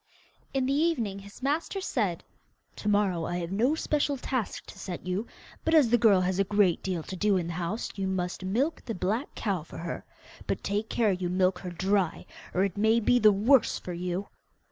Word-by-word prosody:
In 265 -1 0
the 270 - +1
evening 275 -11 +1
his 200 +5 -13
master 310 +7 0
said, 210 - -1 0.5
'To 210 - -2
morrow 195 -5 +2
I 175 - -2
have 170 0 -4
no 240 +10 +2
special 295 -2 0
task 250 -4 -3
to 195 - -12
set 180 -3 -6
you, 185 +5 -2 0.4
but 325 - +3
as 275 -8 +5
the 240 - +6
girl 210 -5 +5
has 185 +1 0
a - - +5
great 195 -3 +2
deal 180 -4 -2
to 190 - -6
do 205 +1 +2
in 175 - -1
the 170 - -4
house 180 +6 -3
you 195 -1 -2
must 185 -1 -2
milk 245 - 0
the 230 - -3
black 210 - -2
cow 195 -6 -1
for 155 - -11
her. 170 +1 -5 0.4
But - - -2
take 205 +2 -1
care 220 -3 +2
you 180 -1 -2
milk 185 0 +2
her 180 - -6
dry, 185 0 0 0.3
or 185 - +2
it 195 -1 -2
may 220 +2 +4
be 245 +2 +3
the 215 -2 +7
worse 225 +6 +4
for 180 - -6
you. 180 +3 -3
200 Hz, 210 wpm, -28 LUFS, 180-235 Hz, 0.5 s, the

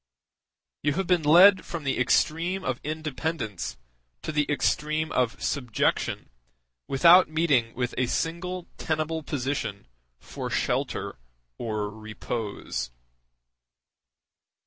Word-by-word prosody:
You 145 0 +1
have 190 +4 -1
been 180 -1 +3
led 180 +6 +7
from 170 -3 -6
the 135 -2 -1
extreme 165 +9 +1
of 130 -2 -2
independence 155 - -4 0.5
to - - -3
the 150 -1 0
extreme 155 +2 0
of 125 -2 0
subjection 125 - -1 0.6
without 170 +6 +6
meeting 145 -8 +1
with 125 0 -2
a 125 - +2
single 175 +5 -2
tenable 160 0 -1
position 130 -8 -3 0.3
for - - -6
shelter - - -2 0.4
or 105 -3 -2
repose. 110 - -5
150 Hz, 100 wpm, -26 LUFS, 120-165 Hz, 0.6 s, led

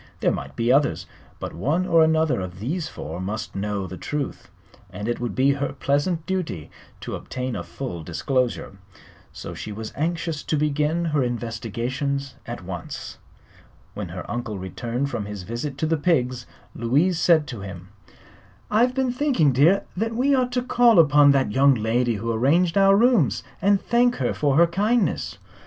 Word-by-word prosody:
There - - +2
might - - -5
be 115 +1 +1
others, 125 - +2 0.3
but - - -5
one 150 - 0
or 165 -2 +5
another 160 -7 +2
of 90 0 -7
these 155 - -2
four 80 +4 -7
must 105 +4 -4
know 100 0 -2
the 95 0 -7
truth, 150 -2 -4 0.4
and 105 +4 -6
it 120 - -1
would 120 -4 -3
be 135 +2 +4
her 140 0 -2
pleasant 145 +5 0
duty 175 - -3 0.3
to - - -6
obtain 130 -1 -4
a - - -3
full 120 -12 -6
disclosure. 115 - -2 0.5
So - - -8
she 110 - -7
was 110 +1 -7
anxious 165 0 -2
to 155 - -1
begin 150 +3 0
her 150 -3 +1
investigations 120 +3 -3
at - - -6
once. - - -7 0.7
When - - -5
her - - -7
uncle 120 -4 -4
returned 120 +8 -3
from 105 - -3
his 105 -2 -6
visit 120 +7 -5
to 160 - -1
the 160 +1 +1
pigs 130 -6 0 0.3
Louise 150 +10 +1
said 165 -4 +4
to 120 - -6
him: 95 -1 -9 0.8
"I've 240 +4 +3
been 265 -2 +1
thinking, 250 - +2
dear, 160 +10 +4
that 225 +4 -2
we 270 +4 +2
ought 255 -2 +2
to 250 0 0
call 240 -3 +4
upon 145 -3 +6
that 135 -5 +1
young 135 +3 +5
lady 115 +1 +1
who 115 +3 -2
arranged 160 +10 +2
our 195 0 +6
rooms, 225 - +3 0.2
and 200 0 +4
thank 245 +3 +2
her - - -1
for 140 -2 +1
her 170 - +7
kindness." 200 - 0
140 Hz, 175 wpm, -23 LUFS, 115-170 Hz, 0.8 s, her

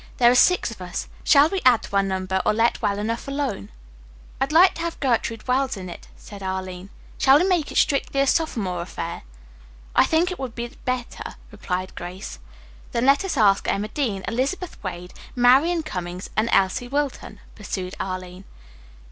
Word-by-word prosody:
There 240 -1 +6
are - - +4
six 305 +2 +4
of 220 - -10
us. 180 -1 -5 0.2
Shall 285 0 +6
we 385 0 -2
add 250 -3 +5
to - - -7
our 200 - +5
number 190 -1 -1
or 210 - +2
let 230 +2 +2
well 200 0 0
enough 230 +4 -3
alone?" 275 - -3 0.7
"I'd 270 +2 +1
like 355 +4 +6
to - - -7
have 335 0 -4
Gertrude 230 -3 -1
Wells 260 -2 +1
in 185 -2 -7
it," - - -11
said 205 -1 -11
Arline. 190 0 -5 0.3
"Shall 270 +1 +6
we 345 - +2
make 350 -6 +1
it - - -3
strictly 275 -1 +2
a - - +3
sophomore 220 - 0
affair?" 170 -1 -5 0.7
"I - - +6
think 335 +3 +2
it 365 - -6
would 260 -4 -5
be 240 0 -4 0.2
better," 250 -1 -4 0.2
replied 185 0 -4
Grace. 175 - -7 0.5
"Then 235 +1 +1
let 275 +6 +4
us 385 -7 -3
ask 200 -3 +4
Emma 210 +2 -1
Dean, 215 -8 -2
Elizabeth 280 +9 -2
Wade, 180 -1 -6 0.2
Marian 275 +8 +4
Cummings 180 - -6
and 220 +2 +1
Elsie 195 +6 +2
Wilton," 285 +1 -3
pursued 190 -3 -5
Arline. 185 0 -5
230 Hz, 180 wpm, -23 LUFS, 190-275 Hz, 0.7 s, There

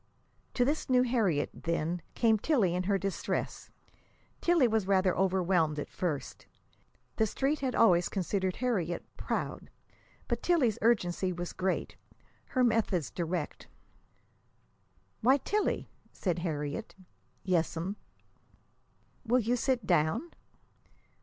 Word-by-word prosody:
To 245 - +3
this 290 +2 -1
new 250 -1 +5
Harriet, 215 - +1
then, 170 +1 -2
came 225 -2 +3
Tillie 215 - +2
in 180 +1 -1
her 200 0 +2
distress. 195 0 -3 0.7
Tillie 340 -7 +4
was 220 -4 0
rather 190 -1 +3
overwhelmed 180 -4 +2
at 145 - -5
first. 155 -6 -4 0.7
The 220 - +3
Street 280 +7 0
had 260 -3 -1
always 175 -6 +4
considered 190 -1 -1
Harriet 195 -9 -1
"proud." - - -3 0.6
But - - -1
Tillie's 285 - +2
urgency 190 -5 +2
was 175 0 -5
great, 185 0 -2 0.5
her 255 - +1
methods 220 - +1
direct. 170 -2 -3 1.5
"Why, 260 +5 +5
Tillie!" 415 +9 -1 0.2
said 180 -3 -2
Harriet. 150 -4 -4 0.5
"Yes'm." 175 +1 0 1.3
"Will 245 +1 +3
you 240 +1 +1
sit 250 -2 0
down?" 180 - +1
195 Hz, 115 wpm, -30 LUFS, 175-245 Hz, 1.5 s, new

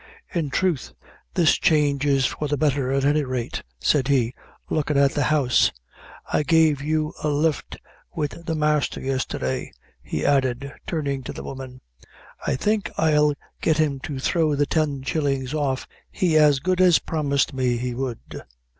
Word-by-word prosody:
"In 165 -5 -1
troth, 170 -3 -1 0.4
this 170 -3 +4
change 145 -2 +2
is 135 -2 +3
for 150 - -2
the 145 0 -1
betther, 140 -3 +1
at 135 0 +1
any 150 +1 +3
rate," 130 -3 -3 0.2
said 135 - +2
he, 130 -4 +2 0.3
looking 150 -2 0
at 140 -1 +4
the 145 - 0
house; 145 -5 +3 0.6
"I - - +3
gave 155 -1 +3
you 155 +1 -1
a - - +1
lift 150 0 0 0.4
wid 150 -1 -1 0.2
the 160 - 0
masther 150 -1 +1
yestherday," 130 - -2 0.3
he 75 - -3
added, 135 0 +1
turning 140 -4 -2
to - - -5
the - - -8
woman. 130 -1 -8 0.7
"I - - +2
think 210 +9 0
I'll 150 -2 +3 0.3
get 160 -1 +2
him 150 -3 +1
to 145 - -5
throw 155 +2 +1
the 145 +1 +2
ten 145 -3 -1
shillings 135 -2 -1
off 140 -4 -1 0.2
he 175 -4 0
as 150 -3 +5
good 185 0 +1
as 180 -3 +6
promised 140 -4 0
me 125 -2 0
he 125 +1 -3
would." 125 -2 -5
145 Hz, 165 wpm, -23 LUFS, 135-155 Hz, 0.7 s, as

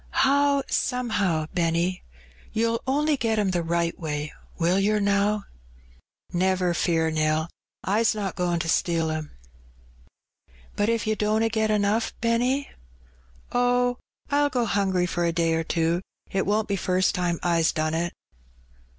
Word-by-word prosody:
"How 280 0 +3
somehow, 205 - 0
Benny? 170 +1 0 0.5
You'll 230 +1 0
only 295 +3 +2
get 225 -3 0
'em 205 -3 +1
the 175 -1 0
right 170 0 -1
way, 150 -2 -4 0.2
will 175 +3 +2
yer, 210 +2 +2
now?" 200 +1 +1 0.9
"Never 180 0 +1
fear, 160 -1 +1
Nell; 155 +1 0 0.3
I's 215 +3 +2
not 200 -3 -3
goin' 175 -1 0
to 165 - -4
steal 165 -1 +1
'em." 155 -1 -4 1.5
"But 205 +2 +1
if 230 -1 0
you 215 0 +1
dunna 215 +2 +1
get 220 -1 0
enough^ 210 +2 +1
Benny?" 245 +4 0 0.8
"Oh, 245 0 +2 0.3
I'll 290 0 +3
go 250 -3 0
hungry 190 -4 +1
for 175 0 -2
a 170 - +2
day 165 -1 +1
or 165 0 0
two; 165 +1 0 0.3
't 195 - +1
won't 210 +1 +1
be 200 - -1
fust 185 0 +1
time 175 -1 0
I's 165 -2 +2
done 155 0 -1
it." 170 +1 -1
195 Hz, 145 wpm, -25 LUFS, 170-225 Hz, 1.5 s, How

